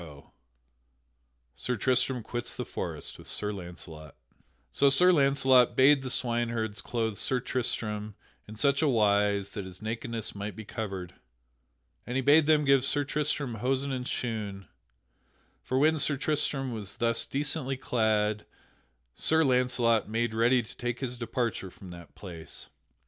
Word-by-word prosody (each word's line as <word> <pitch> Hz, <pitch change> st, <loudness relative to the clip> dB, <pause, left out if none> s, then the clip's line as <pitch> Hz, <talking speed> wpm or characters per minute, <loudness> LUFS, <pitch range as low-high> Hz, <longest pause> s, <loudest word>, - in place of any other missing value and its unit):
[Sidenote: 75 Hz, -4 st, -13 dB, 1.2 s
Sir 125 Hz, -, -2 dB
Tristram 125 Hz, +2 st, +1 dB
quits 120 Hz, +2 st, -3 dB
the -, -, -4 dB
forest -, -, -5 dB
with -, -, -12 dB
Sir 105 Hz, 0 st, 0 dB
Launcelot] 85 Hz, -5 st, -8 dB, 0.6 s
So 140 Hz, -, +4 dB
Sir 180 Hz, +7 st, +6 dB
Launcelot 135 Hz, -5 st, +4 dB
bade 135 Hz, +1 st, +6 dB
the 130 Hz, -, -5 dB
swineherds 115 Hz, -4 st, -1 dB
clothe 110 Hz, -2 st, -2 dB
Sir 130 Hz, +5 st, +2 dB
Tristram 110 Hz, -4 st, -2 dB, 0.3 s
in 110 Hz, -, -9 dB
such 140 Hz, +5 st, +2 dB
a 155 Hz, -, +3 dB
wise 105 Hz, -4 st, +2 dB
that 100 Hz, -, -6 dB
his 95 Hz, -1 st, -10 dB
nakedness 115 Hz, 0 st, -4 dB
might 100 Hz, -1 st, -6 dB
be 110 Hz, -, -8 dB
covered, 95 Hz, -5 st, -5 dB, 0.9 s
and 125 Hz, -, -4 dB
he 135 Hz, -, +1 dB
bade 145 Hz, +3 st, +5 dB
them 150 Hz, -1 st, +4 dB
give 135 Hz, -2 st, +4 dB
Sir 145 Hz, +1 st, +1 dB
Tristram 145 Hz, -2 st, -1 dB
hosen 135 Hz, +2 st, 0 dB
and 125 Hz, -1 st, -3 dB
shoon, 105 Hz, -6 st, -4 dB, 1.0 s
and 130 Hz, -, +2 dB
when 155 Hz, +2 st, +3 dB
Sir 145 Hz, 0 st, +1 dB
Tristram 140 Hz, -3 st, -1 dB
was 105 Hz, -3 st, -4 dB
thus 115 Hz, -1 st, 0 dB
decently 135 Hz, -1 st, -2 dB
clad, 110 Hz, -4 st, 0 dB, 0.7 s
Sir 160 Hz, 0 st, +3 dB
Launcelot 125 Hz, -5 st, +2 dB
made 115 Hz, +1 st, -1 dB
ready 120 Hz, +2 st, +3 dB
to 110 Hz, -, -13 dB
take 120 Hz, 0 st, -3 dB
his 125 Hz, -2 st, -4 dB
departure 115 Hz, -4 st, -2 dB
from 90 Hz, 0 st, -12 dB
that 85 Hz, -1 st, -12 dB
place. 85 Hz, -5 st, -8 dB
120 Hz, 150 wpm, -29 LUFS, 105-135 Hz, 1.2 s, Sir